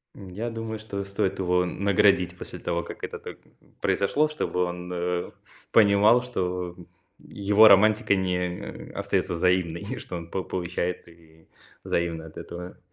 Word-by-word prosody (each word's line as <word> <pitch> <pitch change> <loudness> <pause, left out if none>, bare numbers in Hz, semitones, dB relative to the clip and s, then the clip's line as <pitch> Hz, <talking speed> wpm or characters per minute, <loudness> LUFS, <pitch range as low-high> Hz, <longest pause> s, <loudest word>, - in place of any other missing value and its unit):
М, 95 -2 -10
я 110 +6 -4
думаю, 115 -1 -5
что 100 -2 -5
стоит 95 0 -2
его 90 0 +2
наградить 95 -1 +2
после - - -8
того, 85 0 -2
как - - -10
это - - -5
так - - -9 0.4
произошло, 145 +10 +2
чтобы 150 -11 -1
он, 90 0 -6
э, 90 0 -2 0.4
понимал, 110 +3 +5
что 90 -6 -3 0.4
его 105 +2 +4
романтика 105 0 +5
не 90 -1 -3
остается - - 0
взаимной, 85 -1 +1
и - - -5
что 90 - -7
он 85 -1 -7
п 95 - -1
получает 90 0 -3
и 80 -1 -20 0.4
взаимно 85 -2 -1
от 80 - -13
этого. 90 +1 -8
90 Hz, 150 wpm, -26 LUFS, 90-100 Hz, 0.4 s, понимал